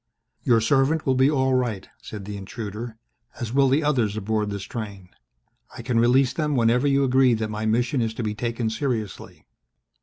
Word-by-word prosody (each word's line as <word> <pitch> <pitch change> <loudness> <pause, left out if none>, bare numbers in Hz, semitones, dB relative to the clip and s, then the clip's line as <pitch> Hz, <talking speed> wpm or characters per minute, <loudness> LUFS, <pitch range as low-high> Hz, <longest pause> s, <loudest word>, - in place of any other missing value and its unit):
"Your 115 -2 +3
servant 135 +6 +2
will 130 - +3
be 130 +2 +4
all 130 -3 +1
right," 120 -6 -1
said 105 -3 -8
the 105 0 -6
intruder, 110 +3 -7 0.4
"as 120 -1 -4
will 135 0 +4
the 145 +4 +2
others 120 -8 +1
aboard 105 0 -1
this 100 -1 -5
train. 100 -7 -7 0.7
I - - -7
can 120 -3 +1
release 125 +2 +3
them 150 -2 -1
whenever 120 +3 +3
you 140 0 +3
agree 130 -2 +4
that 110 -1 -3
my 110 +1 -3
mission 120 +4 +1
is 110 -1 -2
to 120 - -4
be 105 -1 -2
taken 115 0 -2
seriously." 110 - -4
120 Hz, 185 wpm, -24 LUFS, 110-130 Hz, 0.7 s, be